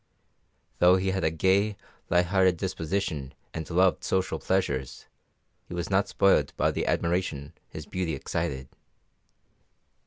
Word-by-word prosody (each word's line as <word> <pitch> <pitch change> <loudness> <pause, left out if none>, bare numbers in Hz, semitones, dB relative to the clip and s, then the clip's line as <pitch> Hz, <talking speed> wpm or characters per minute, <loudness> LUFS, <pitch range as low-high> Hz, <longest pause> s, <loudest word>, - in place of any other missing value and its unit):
Though 90 +1 +6
he 95 0 0
had 95 -1 -2
a - - +3
gay, 95 +6 +1 0.3
light 90 +1 +3
hearted 95 -1 +3
disposition 80 -5 -3 0.2
and 80 -1 -5
loved 90 +1 +2
social 95 0 0
pleasures, 65 -9 -1 0.6
he - - -7
was 85 +2 -4
not 100 +1 +3
spoilt 100 - +2
by - - +2
the - - -2
admiration 85 -5 -1 0.2
his - - -8
beauty 90 -4 -2
excited. 65 -1 -3
90 Hz, 130 wpm, -27 LUFS, 80-95 Hz, 0.6 s, Though